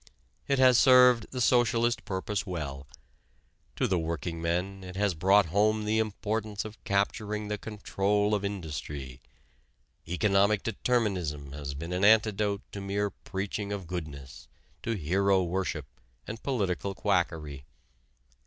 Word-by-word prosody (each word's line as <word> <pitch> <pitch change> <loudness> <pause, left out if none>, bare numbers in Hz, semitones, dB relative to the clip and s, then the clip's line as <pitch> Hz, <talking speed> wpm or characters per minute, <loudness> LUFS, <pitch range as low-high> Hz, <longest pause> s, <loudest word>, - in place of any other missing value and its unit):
It 140 - +2
has 130 -2 +6
served 125 -3 +6
the 130 - -5
socialist 120 -1 +2
purpose 100 +1 -2
well. 70 -8 -5 0.9
To - - +1
the 95 -2 +1
workingmen 85 +4 -3
it 90 0 -9
has 100 -1 +1
brought 95 +4 +4
home 105 +1 +2
the 110 +1 +1
importance 110 0 -2
of 105 -2 -10
capturing 105 +1 -1
the 105 0 -2
control 105 -1 0
of 105 -1 0
industry. 75 -9 -5 0.9
Economic 100 +3 +2
determinism 95 - -1
has 70 -1 -6
been 85 +5 -5
an 90 +2 -1
antidote 105 -1 +3
to 100 - -6
mere 100 +1 -1
preaching 100 +2 -5
of 100 -3 -4
goodness, 75 -6 -7 0.3
to 115 - -2
hero 95 +3 +2
worship 90 -4 -2 0.4
and 110 +1 -7
political 100 - -1
quackery. 80 -8 -1
100 Hz, 125 wpm, -29 LUFS, 85-105 Hz, 0.9 s, has